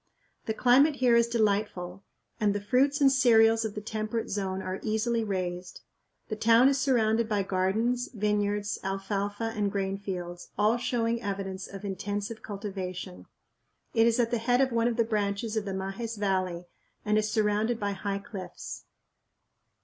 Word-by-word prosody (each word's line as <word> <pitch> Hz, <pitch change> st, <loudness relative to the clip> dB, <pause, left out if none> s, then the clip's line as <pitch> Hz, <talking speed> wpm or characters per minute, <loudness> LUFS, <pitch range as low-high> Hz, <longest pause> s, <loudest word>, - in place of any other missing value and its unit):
The 220 Hz, -, -1 dB
climate 275 Hz, +6 st, +5 dB
here 250 Hz, -3 st, +3 dB
is 235 Hz, 0 st, +4 dB
delightful 200 Hz, -5 st, -1 dB, 0.4 s
and 205 Hz, -1 st, +2 dB
the -, -, 0 dB
fruits 265 Hz, +8 st, +2 dB
and 275 Hz, -1 st, +6 dB
cereals 225 Hz, -3 st, +5 dB
of 220 Hz, -2 st, -4 dB
the 210 Hz, -, -4 dB
temperate 215 Hz, +1 st, -3 dB
zone 190 Hz, -2 st, -2 dB
are 190 Hz, 0 st, -4 dB
easily 225 Hz, +1 st, 0 dB
raised. 180 Hz, -3 st, -4 dB, 0.5 s
The 215 Hz, -, -3 dB
town 230 Hz, +4 st, +5 dB
is 275 Hz, -1 st, +1 dB
surrounded 230 Hz, -4 st, +2 dB
by 205 Hz, -2 st, +1 dB
gardens, 215 Hz, +7 st, 0 dB
vineyards, 210 Hz, -1 st, -1 dB
alfalfa 200 Hz, +3 st, -2 dB
and 205 Hz, -2 st, 0 dB
grain 195 Hz, 0 st, -2 dB
fields; 180 Hz, -3 st, -6 dB
all 215 Hz, +3 st, +3 dB
showing 235 Hz, -1 st, -1 dB
evidence 195 Hz, -2 st, -4 dB
of 195 Hz, +1 st, -9 dB
intensive 205 Hz, +3 st, -4 dB
cultivation. 190 Hz, -3 st, -6 dB, 0.7 s
It 225 Hz, 0 st, +4 dB
is 235 Hz, +1 st, +2 dB
at 230 Hz, -1 st, +2 dB
the 240 Hz, -, +1 dB
head 245 Hz, +2 st, +2 dB
of 265 Hz, -1 st, +3 dB
one 230 Hz, 0 st, +2 dB
of 240 Hz, -1 st, -1 dB
the 230 Hz, -, +4 dB
branches 210 Hz, 0 st, -1 dB
of 215 Hz, -2 st, -1 dB
the 195 Hz, -1 st, -3 dB
Majes 205 Hz, +4 st, -4 dB
Valley 185 Hz, -3 st, -1 dB, 0.4 s
and 210 Hz, 0 st, +2 dB
is 215 Hz, 0 st, -1 dB
surrounded 215 Hz, +2 st, +1 dB
by 205 Hz, -1 st, -1 dB
high 200 Hz, 0 st, -3 dB
cliffs. 195 Hz, -3 st, -8 dB
210 Hz, 165 wpm, -28 LUFS, 195-230 Hz, 0.7 s, and